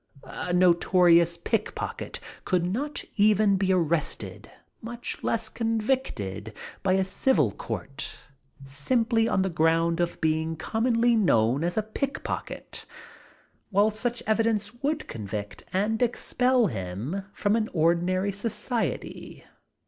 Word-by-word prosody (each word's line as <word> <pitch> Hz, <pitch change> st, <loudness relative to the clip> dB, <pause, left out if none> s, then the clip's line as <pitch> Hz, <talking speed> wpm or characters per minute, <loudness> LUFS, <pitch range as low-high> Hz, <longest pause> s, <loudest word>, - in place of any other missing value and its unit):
A 180 Hz, -, -5 dB
notorious 175 Hz, -1 st, +4 dB
pickpocket 215 Hz, +5 st, -2 dB, 0.2 s
could 180 Hz, -3 st, +1 dB
not 265 Hz, +12 st, -2 dB
even 210 Hz, -1 st, +4 dB
be 190 Hz, 0 st, +1 dB
arrested, 170 Hz, -3 st, -1 dB, 0.3 s
much 240 Hz, +1 st, -6 dB
less 225 Hz, -1 st, 0 dB
convicted, 220 Hz, -, -2 dB, 0.3 s
by 190 Hz, -1 st, +2 dB
a 190 Hz, 0 st, +3 dB
civil 185 Hz, -, +2 dB
court, 135 Hz, +8 st, -5 dB, 0.5 s
simply 225 Hz, -, +1 dB
on 190 Hz, -, +2 dB
the 190 Hz, -, 0 dB
ground 165 Hz, +1 st, +2 dB
of 175 Hz, 0 st, -1 dB
being 160 Hz, 0 st, 0 dB
commonly 230 Hz, +6 st, +2 dB
known 130 Hz, -, +3 dB
as 175 Hz, +3 st, -1 dB
a 215 Hz, -, +2 dB
pickpocket; 275 Hz, +6 st, -4 dB, 0.8 s
while 205 Hz, +1 st, +3 dB
such 235 Hz, +3 st, -3 dB
evidence 220 Hz, -1 st, +1 dB
would 305 Hz, +2 st, -1 dB
convict 105 Hz, -1 st, -6 dB
and 210 Hz, +4 st, 0 dB
expel 250 Hz, +1 st, +2 dB
him 110 Hz, -, -3 dB
from 205 Hz, +1 st, +1 dB
any 220 Hz, -1 st, +1 dB
ordinary 175 Hz, +3 st, +1 dB
society. 220 Hz, +3 st, -3 dB
190 Hz, 115 wpm, -27 LUFS, 165-225 Hz, 0.8 s, notorious